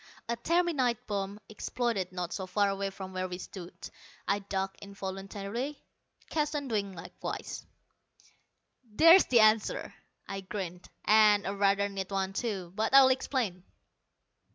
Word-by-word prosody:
A 235 - 0
terminite 275 -3 +1
bomb 200 0 -3
exploded 215 -3 -2
not 180 -2 -4
so 190 -2 -4
far 200 +2 +2
away 195 0 -2
from 190 -1 -8
where 185 0 -2
we 180 -1 -5
stood. 180 -1 -9 0.6
I 200 - +2
ducked 195 -1 -3
involuntarily, 200 +7 -5 0.5
Keston 295 -2 -1
doing 205 -5 -1
likewise. 170 - -6 1.2
"There's 325 - +7
the 240 -3 +5
answer," 215 0 +3 0.3
I 195 0 -4
grinned, 185 -2 -6 0.2
"and 210 -1 +6
a 195 - -2
rather 200 0 +3
neat 195 -1 -5
one, 195 -1 -1
too. 195 -6 -3
But 220 +5 +1
I'll 270 -1 +9
explain." 250 -8 -1
200 Hz, 130 wpm, -30 LUFS, 195-235 Hz, 1.2 s, I'll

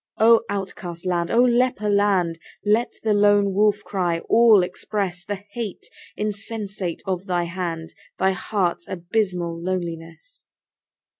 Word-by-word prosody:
O 230 +1 +6
outcast 185 -3 -5
land! 175 -2 0
O 240 +2 +4
leper 245 -3 +2
land! 195 -5 +2 0.3
Let 220 +4 +2
the 220 -1 +2
lone 205 -1 +4
wolf 210 +1 +2
cry 180 -4 -1
all 225 -4 +5
express 180 0 -3
The 200 -1 -5
hate 220 -4 -5 0.3
insensate 205 -4 -4
of 190 0 -3
thy 175 -1 +1
hand, 170 -2 -4 0.2
Thy 190 0 +3
heart's 190 -2 -2
abysmal 175 -2 -2
loneliness. 175 - -5
195 Hz, 125 wpm, -23 LUFS, 175-210 Hz, 0.3 s, O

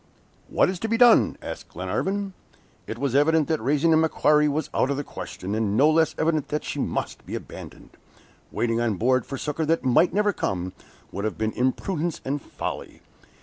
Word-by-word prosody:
"What - - +3
is 185 -1 -3
to 225 - -2
be 230 - +1
done?" 240 -1 +5
asked - - -7
Glenarvan. 195 0 -2 0.5
It 110 - -5
was 135 0 -1
evident 150 +2 +3
that 160 -2 0
raising 145 +6 +2
the 160 - +5
MACQUARIE 150 -1 +3
was 150 +1 -1
out 130 - +1
of 140 - -1
the 145 - -2
question, 100 -6 -7
and 105 -1 0
no 150 +4 +5
less 160 0 +2
evident 155 -2 0
that 150 - -2
she - - -4
must - - -3
be - - -6
abandoned. - - -10 0.6
Waiting 115 0 0
on 115 -3 0
board 125 +4 +1
for 135 - -5
succor 150 +3 -2
that 165 -3 +1
might 130 +8 +4
never 205 +1 +2
come, 90 - -3 0.4
would 100 - -5
have 110 - -2
been 110 0 -1
imprudence 155 - -1
and 140 +2 -2
folly. - - -6
145 Hz, 190 wpm, -25 LUFS, 120-160 Hz, 0.6 s, done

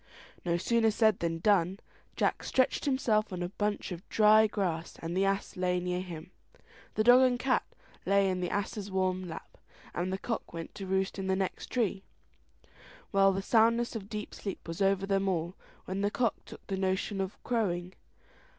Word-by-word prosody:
No 170 -1 +1
sooner 225 +5 +2
said 220 -1 +3
than 165 -1 -1
done. 190 +1 +2 0.4
Jack - - 0
stretched 260 +3 +1
himself 225 -6 +1
on 180 -1 -3
a 175 - -3
bunch 205 0 -2
of 180 +3 -8
dry 215 0 +6
grass, 175 -6 -2
the 175 +4 -1
ass 195 0 -1
lay 180 0 +1
near 180 0 -2
him, 175 -1 -8 0.6
the 215 - +2
dog 245 +3 +8
and 255 -1 +4
cat 255 +1 +1 0.4
lay 200 0 +3
in 185 -1 0
the 180 - -1
ass's 205 0 -3
warm 185 -1 0
lap, 160 -1 -9 0.3
and 180 +2 -2
the 190 - -1
cock 225 -1 -4
went 165 -1 -6
to 195 -2 -7
roost 190 +1 0
in 190 - -3
the 190 - +2
next 190 -1 -3
tree. 215 -6 0 1.1
Well, 195 0 +5
the 195 0 -2
soundness 230 +2 +3
of 205 -2 -6
deep 210 -1 -5
sleep 195 -3 -6
was 165 +3 -5
over 195 0 +2
them 195 0 +1
all, 175 -1 -1 0.3
when 190 +1 -3
the 205 - +2
cock 230 0 +1
took - - -11
a 190 - 0
notion 190 +1 -1
of 190 0 -4
crowing. 185 -7 -1
195 Hz, 185 wpm, -30 LUFS, 180-215 Hz, 1.1 s, dog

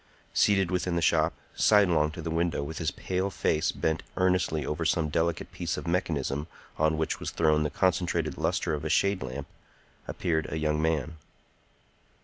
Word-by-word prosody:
Seated 95 -3 +3
within 90 -1 0
the 85 - +1
shop, - - +3 0.2
sidelong 90 -8 +4
to 85 -2 -7
the 80 - -3
window 85 -2 0
with 80 +3 -6
his 80 -3 0
pale 95 +5 -2
face 80 -3 0
bent 80 0 -1 0.2
earnestly 90 -5 +1
over 75 +2 -2
some 80 -1 +1
delicate 80 +2 -1
piece - - -3
of - - -6
mechanism 75 -5 -1 0.3
on 80 0 +2
which 80 - -1
was - - -3
thrown 75 -2 +2
the 75 - 0
concentrated 85 -3 0
lustre - - 0
of 75 - -3
a 80 - -2
shade 100 +4 +2
lamp, 65 +2 -5 0.6
appeared 80 -3 -1
a 80 - -2
young 75 0 0
man. 80 -1 -1
80 Hz, 170 wpm, -28 LUFS, 75-90 Hz, 0.6 s, sidelong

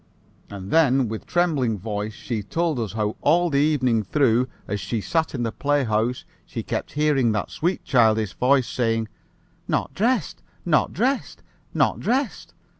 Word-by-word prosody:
And 95 -1 -8
then, 135 -6 +4
with 110 0 -6
trembling 150 -11 +1
voice, 105 +1 -4
she 115 -2 -4
told 160 - -1
us 110 -4 -3
how 105 -1 -2
all 170 +3 +3
the 140 - +2
evening 130 -6 +2
through, 125 +2 +2 0.2
as 100 +1 -2
she 100 +4 -3
sat 160 +8 -1
in 120 - -2
the 115 - -1
playhouse 125 -4 0 0.2
she - - -6
kept - - -4
hearing 145 -6 +2
that 105 - -2
sweet 175 +4 -1
childish 110 -4 +2
voice 130 0 +2
saying 115 -2 -1 0.6
'Not - - -1
dressed! 230 - 0 0.2
Not 160 -3 +2
dressed! 255 +7 -1 0.3
Not - - +2
dressed!' 260 +2 -2
125 Hz, 155 wpm, -23 LUFS, 110-155 Hz, 0.6 s, then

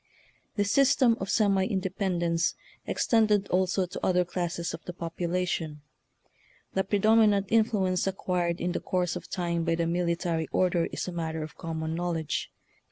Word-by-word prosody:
This 205 -1 +1
system 270 -2 +4
of 190 - -4
semi 200 -3 +3
independence 180 -3 0 0.3
ex - - -1
tended 210 -3 +3
also 185 +1 +1
to 180 - -8
other 180 -1 +3
classes 175 -1 -3
of - - -8
the 180 - -5
popula 175 +1 -2
tion. 155 -4 -3 0.9
The 190 - +1
predominant 210 0 +4
influence 205 -5 +2
acquired 180 -2 -1
in 175 - -1
the - - -2
course 180 -1 -1
of 180 - -7
time 170 -2 -1
by 165 0 +1
the 170 0 0
military 170 -1 0
order 180 -2 +2
is - - -5
a - - -3
matter 160 -2 -3
of 155 - -9
common 160 -1 -4
knowledge. 165 -2 -2
180 Hz, 160 wpm, -28 LUFS, 170-195 Hz, 0.9 s, system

